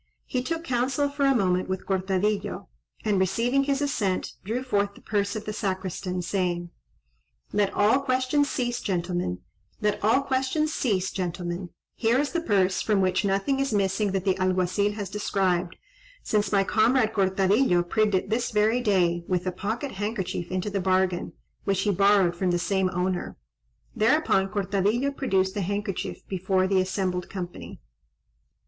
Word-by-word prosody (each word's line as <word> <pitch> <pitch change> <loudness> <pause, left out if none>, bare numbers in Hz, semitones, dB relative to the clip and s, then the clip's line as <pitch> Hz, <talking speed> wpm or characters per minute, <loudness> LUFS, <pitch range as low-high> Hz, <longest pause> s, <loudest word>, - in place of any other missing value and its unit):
He 250 - -1
took 325 +5 -3
counsel 265 +1 0
for 280 0 0
a 275 -1 +4
moment 185 -4 +1
with 190 0 -3
Cortadillo, 195 +1 -1 0.4
and 205 -3 +2
receiving 235 +9 +1
his 280 0 0
assent, 205 -10 -1
drew 230 +6 -2
forth 200 -5 0
the - - -15
purse 200 -1 -1
of 215 0 -5
the 215 - -4
Sacristan, 185 -2 -3
saying:— 175 -2 -1 0.8
"Let 205 -1 +2
all 215 +6 +4
questions 265 +2 +1
cease, 240 -2 -2
gentlemen: 175 - -2 0.4
here 210 -1 0 2.2
is 285 +1 0
the 340 - -1
purse, 195 - +2
from 210 -2 +1
which 185 +1 +1
nothing 200 +8 +1
is 275 -1 0
missing 200 0 +1
that 190 -1 -1
the 190 - +3
Alguazil 185 +2 +1
has 205 -2 -4
described, 185 -3 0 0.5
since 210 -1 0
my 200 -1 +4
comrade 225 +3 +2
Cortadillo 190 0 +3
prigged 210 +3 +1
it 185 - -1
this 235 +2 0
very 215 +3 +2
day, 175 -6 +2
with 180 -1 0
a 185 - 0
pocket 220 +9 -3
handkerchief 190 -4 -3
into 185 +3 -2
the 195 -1 -1
bargain, 185 -1 +1 0.3
which 195 -1 +1
he 205 - +2
borrowed 195 -2 +4
from 185 +1 0
the 175 - +2
same 190 +1 +1
owner." 180 0 -2 0.6
Thereupon 215 -5 +3
Cortadillo 205 +7 0
produced 190 -9 0
the 205 - -2
handkerchief 200 +1 -3
before 190 0 +1
the 190 0 +3
assembled 185 -1 -2
company. 180 -3 -7
200 Hz, 150 wpm, -26 LUFS, 185-220 Hz, 2.2 s, a